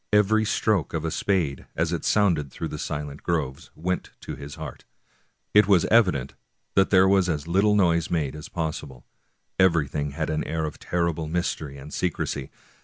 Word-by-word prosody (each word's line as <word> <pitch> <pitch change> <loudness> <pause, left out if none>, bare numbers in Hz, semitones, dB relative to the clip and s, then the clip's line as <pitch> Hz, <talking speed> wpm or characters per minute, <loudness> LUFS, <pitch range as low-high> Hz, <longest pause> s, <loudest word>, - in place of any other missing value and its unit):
Every 105 +1 +4
stroke 105 -6 +1
of 80 0 -2
a 80 - -1
spade, 85 -10 0
as - - 0
it - - -2
sounded 85 -9 +2
through 80 +5 -5
the 75 - -6
silent 75 -1 -4
groves, 75 -6 -2
went 90 +3 -2
to - - -6
his 70 0 -8
heart. 80 -4 -8 0.7
It 105 -1 +6
was 95 -5 +5
evident 90 - +3 0.4
there 95 -1 +5
was 95 -2 +3
as 75 -3 -1
little 100 +4 +3
noise 85 -4 +3
made 75 -5 -1
as 75 - -8
possible; 75 -6 -4 0.5
every 85 -6 +4
thing 75 0 -3
had - - -2
an 75 - -1
air 80 0 -2
of 75 - -6
terrible 85 -2 -1
mystery 80 -4 -2
and 70 +2 -10
secrecy. 75 -6 -2
80 Hz, 175 wpm, -25 LUFS, 75-95 Hz, 0.7 s, It